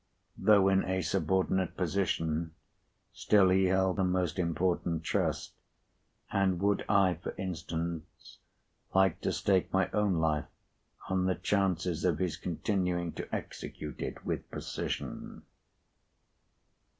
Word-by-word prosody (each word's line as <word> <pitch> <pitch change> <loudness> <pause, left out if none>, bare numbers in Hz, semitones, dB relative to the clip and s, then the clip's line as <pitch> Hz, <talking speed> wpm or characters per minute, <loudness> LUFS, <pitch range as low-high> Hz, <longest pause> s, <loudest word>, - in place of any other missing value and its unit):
Though 100 -3 +5
in 95 0 +3
a 95 0 -1
subordinate 95 +2 0
position, 80 -3 -1 0.6
still 100 -3 +4
he 95 +1 +4
held 95 +1 +2
a - - +3
most 90 -1 0
important 85 -1 0
trust, - - -1 0.8
and 95 -3 +2
would 100 +1 +1
I 95 -5 +3
(for - - -5
instance) 85 -3 -5 0.6
like 95 -2 +3
to - - 0
stake 95 -2 +1
my 95 0 +1
own 105 -3 +2
life 80 -2 +1 0.6
on 95 -1 +1
the 95 - +1
chances 90 -4 0
of 85 -5 +2
his 90 -1 -1
continuing 90 -1 -1
to - - -7
execute 75 -1 -6
it - - -5
with - - -3
precision? - - -5
90 Hz, 120 wpm, -31 LUFS, 85-95 Hz, 0.8 s, Though